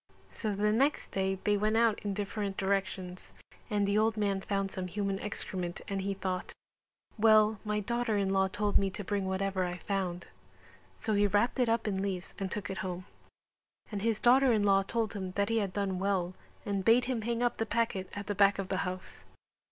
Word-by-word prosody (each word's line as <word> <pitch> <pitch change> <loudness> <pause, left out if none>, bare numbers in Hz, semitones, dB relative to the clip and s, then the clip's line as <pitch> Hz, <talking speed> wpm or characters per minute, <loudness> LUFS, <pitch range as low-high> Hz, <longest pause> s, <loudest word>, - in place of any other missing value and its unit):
So 215 -3 -3
the 210 +1 +2
next 275 +7 +1
day 190 0 0
they 210 - +3
went 215 +2 +1
out 230 -2 +3
in 200 -1 -2
different 205 -1 -3
directions 190 -2 -2 0.4
and 205 -1 +1
the 200 +1 +3
old 220 0 +2
man 200 -2 0
found 195 -1 -1
some 185 -1 -4
human 195 +1 -2
excrement 180 -4 -4
and 195 -1 -2
he 195 +1 -2
thought 185 -1 -3 0.7
"Well, 215 -1 +5
my 210 -1 -1
daughter 235 0 0
in 195 -1 +1
law 190 0 +3
told 205 +2 +1
me 195 - +1
to 205 +2 -6
bring 195 0 -1
whatever 190 0 0
I 180 0 -3
found" 180 -2 -2 0.7
so 220 - -1
he 205 0 +4
wrapped 205 +6 +1
it 245 -2 +3
up 230 -1 +1
in 190 -2 0
leaves 190 -2 -3
and 195 -1 -2
took 210 -2 -3
it 190 - -4
home; 180 -1 -4 0.9
and 205 -2 -3
his 225 0 +1
daughter 260 +2 +5
in 215 -3 +3
law 195 -1 +5
told 220 +2 -2
him 190 -2 -5
that 200 +2 0
he 230 0 +2
had 200 -3 -1
done 195 -2 -1
well 190 -2 0 0.3
and 200 -2 -1
bade 235 +3 +5
him 250 -3 -1
hang 235 +2 -1
up 240 - +1
the 225 - -1
packet 220 -5 -1
at 205 0 -5
the 205 - -2
back 200 0 +4
of 195 -2 -4
the 190 - 0
house. 185 0 -5
200 Hz, 210 wpm, -31 LUFS, 190-215 Hz, 0.9 s, Well